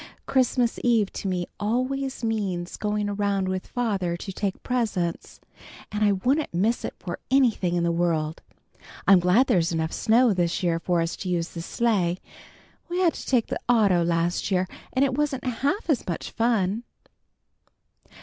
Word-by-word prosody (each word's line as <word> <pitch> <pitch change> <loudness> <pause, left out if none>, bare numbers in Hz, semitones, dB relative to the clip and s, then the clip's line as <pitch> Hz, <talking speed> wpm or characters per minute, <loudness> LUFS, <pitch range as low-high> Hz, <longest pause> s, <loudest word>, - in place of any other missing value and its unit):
"Christmas 250 -2 +1
eve 225 -5 +2
to - - -4
me 180 -2 -1
always 255 +5 -1
means 195 -6 -2
going 210 0 -1
around 200 -1 0
with 185 0 -3
father 195 -8 -1
to 195 - -6
take 195 0 -3
presents, 210 -9 -2 0.5
and 210 0 -1
I 205 -1 +4
wouldn't 255 - 0
miss 215 +7 +1
it - - -4
for 175 -2 -6
anything 230 -9 +3
in 175 - +1
the 170 - +2
world. 165 -2 0 0.7
I'm 195 -2 +8
glad 180 +9 +4
there's 170 -8 +2
enough 160 -1 -1
snow 235 +1 +4
this 175 -1 0
year 170 -2 +1
for 175 0 +1
us 165 +1 -2
to 185 - -5
use 170 -1 -1
the 170 - -7
sleigh. 185 -3 0 0.7
We 350 - -2
had 350 -3 +3
to - - -8
take 245 -4 +3
the - - -4
auto 200 -7 +4
last 170 +2 0
year, 185 -1 +1 0.2
and 265 +2 +3
it 265 - -1
wasn't 285 -2 -1
half 275 - -1
as 295 -8 0
much 170 - -4
fun." 225 -3 +1
200 Hz, 170 wpm, -25 LUFS, 175-240 Hz, 0.7 s, I'm